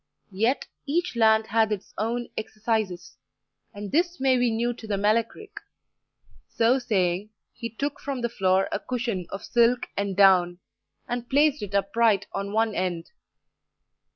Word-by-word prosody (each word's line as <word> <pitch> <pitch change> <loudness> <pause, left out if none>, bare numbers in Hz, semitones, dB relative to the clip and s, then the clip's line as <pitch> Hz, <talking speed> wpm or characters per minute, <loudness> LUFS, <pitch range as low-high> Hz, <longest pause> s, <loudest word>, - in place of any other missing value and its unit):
Yet, 225 +8 +1 0.2
each 340 +1 -1
land 220 -1 +4
hath 220 0 +2
its 205 -2 -4
own 235 +3 -2
exercises, 215 - -3 0.5
and 205 0 -7
this 345 +1 +1
may 265 -1 +3
be 245 -1 +2
new 235 +2 0
to 230 -2 -11
the 205 -2 -1
Melech 215 +3 +1
Ric." 425 -1 -11 0.9
So 235 +3 +2
saying, 190 -4 0 0.2
he 230 -1 -6
took 280 +5 -4
from 275 -3 -4
the 235 - +1
floor 190 -4 +1
a - - -1
cushion 235 -8 -3
of 195 - -7
silk 240 +1 +3
and 200 -1 -2
down, 180 -3 +5 0.5
and 245 0 -4
placed 290 +1 +3
it 205 -1 -5
upright 200 0 +2
on 200 0 -3
one 220 0 +1
end. 175 -3 -3
225 Hz, 155 wpm, -25 LUFS, 200-245 Hz, 0.9 s, down